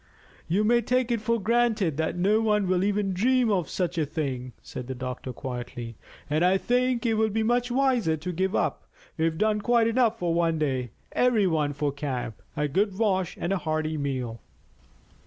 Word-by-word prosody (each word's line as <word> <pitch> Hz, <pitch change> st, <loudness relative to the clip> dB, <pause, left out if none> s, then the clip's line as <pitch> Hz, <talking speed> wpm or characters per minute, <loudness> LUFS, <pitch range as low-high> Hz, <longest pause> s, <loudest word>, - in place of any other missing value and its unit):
"You 190 Hz, +6 st, +2 dB
may 235 Hz, +2 st, +4 dB
take 250 Hz, +1 st, +1 dB
it 230 Hz, -2 st, 0 dB
for 230 Hz, +1 st, +1 dB
granted 220 Hz, -7 st, +1 dB
that 160 Hz, +1 st, -1 dB
no 205 Hz, +5 st, +3 dB
one 210 Hz, -3 st, +2 dB
will 185 Hz, 0 st, +2 dB
even 205 Hz, -1 st, 0 dB
dream 245 Hz, +4 st, +2 dB
of 180 Hz, -5 st, 0 dB
such 175 Hz, -2 st, -1 dB
a 155 Hz, -, +2 dB
thing," 135 Hz, -5 st, -3 dB
said 125 Hz, -, -7 dB
the 130 Hz, -, -4 dB
doctor 130 Hz, 0 st, -5 dB
quietly; 120 Hz, -2 st, -6 dB, 0.3 s
"and 155 Hz, +3 st, +1 dB
I 185 Hz, +2 st, +4 dB
think 250 Hz, +3 st, +1 dB
it 230 Hz, -, +2 dB
will 220 Hz, 0 st, +2 dB
be 220 Hz, +1 st, 0 dB
much 245 Hz, +2 st, +1 dB
wiser 245 Hz, -10 st, +2 dB
to 175 Hz, +4 st, -4 dB
give 190 Hz, +3 st, 0 dB
up. -, -, -1 dB, 0.3 s
We've 160 Hz, 0 st, 0 dB
done 215 Hz, +1 st, +1 dB
quite 235 Hz, +1 st, +3 dB
enough 230 Hz, -1 st, +2 dB
for 175 Hz, -5 st, 0 dB
one 165 Hz, -1 st, +1 dB
day. 130 Hz, -5 st, -1 dB, 0.2 s
Every 245 Hz, -5 st, +3 dB
one 155 Hz, -5 st, +1 dB
for 145 Hz, 0 st, -1 dB
camp, 130 Hz, -6 st, -4 dB, 0.2 s
a 150 Hz, -, +1 dB
good 190 Hz, +6 st, 0 dB
wash, 190 Hz, -5 st, 0 dB
and 185 Hz, -, -1 dB
a 195 Hz, -, 0 dB
hearty 155 Hz, -1 st, -1 dB
meal." 130 Hz, -6 st, -3 dB
185 Hz, 195 wpm, -26 LUFS, 150-225 Hz, 0.3 s, may